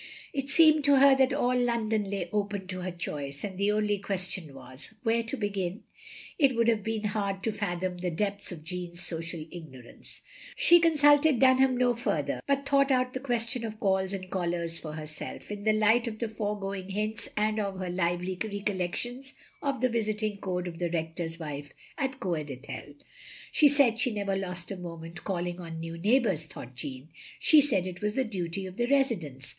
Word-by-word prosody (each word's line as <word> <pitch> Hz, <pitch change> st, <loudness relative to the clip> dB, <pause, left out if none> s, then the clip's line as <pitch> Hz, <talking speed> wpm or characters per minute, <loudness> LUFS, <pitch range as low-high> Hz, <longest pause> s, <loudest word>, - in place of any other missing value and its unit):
It 275 Hz, -1 st, -3 dB
seemed 310 Hz, 0 st, +6 dB
to 285 Hz, -1 st, +6 dB
her 275 Hz, 0 st, +7 dB
that 265 Hz, -1 st, +4 dB
all 250 Hz, +1 st, +1 dB
London 225 Hz, -4 st, +1 dB
lay 195 Hz, -3 st, -2 dB
open 205 Hz, -2 st, -1 dB
to 185 Hz, -1 st, -4 dB
her 185 Hz, -, -3 dB
choice; 145 Hz, -5 st, -4 dB
and 195 Hz, -2 st, -4 dB
the 200 Hz, +2 st, +1 dB
only 210 Hz, -1 st, +1 dB
question 185 Hz, -5 st, -2 dB
was 130 Hz, -, -8 dB
— 220 Hz, -, -34 dB
^where 230 Hz, +1 st, +2 dB
to 275 Hz, -, -2 dB
begin? 200 Hz, -3 st, -2 dB, 0.6 s
It 275 Hz, -4 st, +4 dB
would 230 Hz, 0 st, +2 dB
have 225 Hz, -2 st, +2 dB
been 220 Hz, 0 st, -2 dB
hard 200 Hz, -2 st, -2 dB
to 225 Hz, -, +1 dB
fathom 180 Hz, -3 st, -3 dB
the 180 Hz, 0 st, -1 dB
depths 200 Hz, +4 st, -2 dB
of 160 Hz, -4 st, -8 dB
Jeanne's 175 Hz, 0 st, -5 dB
social 165 Hz, -1 st, -3 dB
ignorance. 130 Hz, -8 st, -10 dB, 0.3 s
She 420 Hz, -10 st, +7 dB
constilted 295 Hz, -4 st, +5 dB
Dtmham 260 Hz, -1 st, +5 dB
no 245 Hz, -1 st, +3 dB
further, 240 Hz, +1 st, -1 dB
but 280 Hz, 0 st, +1 dB
thought 275 Hz, 0 st, +4 dB
out 255 Hz, -1 st, +2 dB
the 260 Hz, -, -3 dB
question 240 Hz, -2 st, -1 dB
of 220 Hz, -1 st, -5 dB
calls 190 Hz, -2 st, +1 dB
and 185 Hz, -2 st, -6 dB
callers 170 Hz, -2 st, -1 dB
for 155 Hz, -2 st, -7 dB
herself, 155 Hz, +5 st, -7 dB
in 205 Hz, 0 st, -6 dB
the 215 Hz, -, +5 dB
light 220 Hz, +3 st, +3 dB
of 220 Hz, -2 st, -4 dB
the 230 Hz, -, -2 dB
foregoing 200 Hz, -3 st, -3 dB
hints, 215 Hz, +3 st, -2 dB
and 215 Hz, +1 st, +1 dB
of 200 Hz, -2 st, -2 dB
her 185 Hz, -1 st, -3 dB
lively 180 Hz, +1 st, -1 dB
recollections 210 Hz, +6 st, -3 dB, 0.3 s
of 275 Hz, -3 st, -1 dB
the 255 Hz, -, +3 dB
visiting 215 Hz, -2 st, -1 dB
code 180 Hz, -2 st, -3 dB
of 170 Hz, -1 st, -7 dB
the 175 Hz, -1 st, 0 dB
Rector's 165 Hz, 0 st, -3 dB
wife 145 Hz, -3 st, -6 dB, 0.3 s
at 265 Hz, -1 st, -2 dB
Coed 165 Hz, -5 st, -2 dB
Ithel. 145 Hz, +1 st, -8 dB, 0.3 s
" -, -, -16 dB
She 295 Hz, -, +6 dB
said 270 Hz, -5 st, +5 dB
she 250 Hz, -, +3 dB
never 200 Hz, -3 st, -1 dB
lost 180 Hz, -2 st, -4 dB
a 195 Hz, -, -4 dB
moment 170 Hz, -1 st, -8 dB
calling 175 Hz, -2 st, -2 dB
on 165 Hz, -2 st, -7 dB
new 165 Hz, 0 st, -5 dB
neighbours," 195 Hz, -, +2 dB
thought 130 Hz, -4 st, -10 dB
Jeanne, 130 Hz, +3 st, -6 dB, 0.3 s
"she 310 Hz, -2 st, +7 dB
said 195 Hz, -11 st, +2 dB
it 180 Hz, -1 st, -6 dB
was 210 Hz, +1 st, -1 dB
the 265 Hz, -, +2 dB
duty 190 Hz, -4 st, -3 dB
of 185 Hz, 0 st, -9 dB
the 240 Hz, -, +1 dB
residents. 200 Hz, -, 0 dB
200 Hz, 195 wpm, -29 LUFS, 175-235 Hz, 0.6 s, her